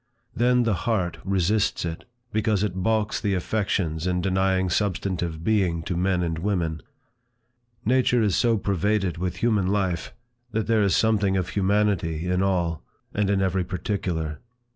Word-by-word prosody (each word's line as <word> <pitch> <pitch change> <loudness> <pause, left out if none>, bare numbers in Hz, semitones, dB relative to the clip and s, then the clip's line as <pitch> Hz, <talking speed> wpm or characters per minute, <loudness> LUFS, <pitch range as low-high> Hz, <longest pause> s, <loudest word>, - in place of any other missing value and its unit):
Then 125 +1 +3
the 115 -2 +1 0.2
heart 90 -7 0
resists 95 +1 +1
it, 80 -1 -5 0.3
because 105 -2 +1
it 105 -4 -1
balks 110 +1 0
the 100 -2 +1
affections 90 -4 -1
in 90 0 +1
denying 95 0 +1
substantive 90 -4 -1
being 90 -6 +1
to 90 - -3
men 90 0 +1
and 80 -2 -2
women. 85 -4 -1 1.0
Nature 125 -1 +3
is 100 -3 +2
so 115 -2 +3
pervaded 100 -2 0
with 90 0 -2
human 105 -6 +2
life, 95 -4 -1 0.4
that 110 -1 0
there 115 -1 +2
is 100 -2 +3
something 105 -3 +2
of 90 -1 -1
humanity 95 -5 +1
in 90 +1 +1
all, 85 -4 0 0.3
and 105 -1 0
in 100 -1 +2
every 95 0 +1
particular. 85 -4 -3
95 Hz, 150 wpm, -25 LUFS, 85-105 Hz, 1.0 s, Then